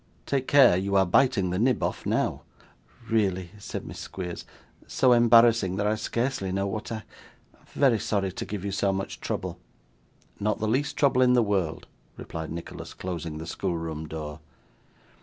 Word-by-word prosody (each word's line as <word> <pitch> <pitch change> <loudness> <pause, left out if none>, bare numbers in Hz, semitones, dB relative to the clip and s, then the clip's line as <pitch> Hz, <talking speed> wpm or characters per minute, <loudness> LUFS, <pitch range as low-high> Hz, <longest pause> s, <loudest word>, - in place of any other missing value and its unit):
Take 135 -2 -1
care! 135 -9 +7
You 100 +2 -1
are 95 -1 +5
biting 95 -1 +3
the 90 - -1
nib 125 +1 +2
off - - -2
now.' - - 0 0.7
'Really,' 95 -6 0
said - - -6
Miss - - -8
Squeers; 90 -1 -6 0.4
'so 130 - +3
embarrassing 115 -5 +5
that 100 +1 -1
I 105 - +2
scarcely 115 -2 -2
know 95 +1 0
what 105 +4 -4
I 110 -1 -4 0.7
very 130 -6 +3
sorry 100 -3 -1
to - - -5
give 100 -2 -5
you 100 - -2
so 100 0 +1
much 95 0 -4
trouble.' - - -4 0.8
'Not 105 +1 0
the 110 -1 -2
least 135 +6 0
trouble 135 -3 +3
in 125 -1 +5
the 120 -1 +4
world,' 95 -7 -1 0.3
replied 80 -1 -6
Nicholas, 85 +1 -7
closing 85 -4 -5
the 80 - -6
schoolroom 80 -2 -3
door. 75 -1 -6
100 Hz, 165 wpm, -26 LUFS, 90-115 Hz, 0.8 s, care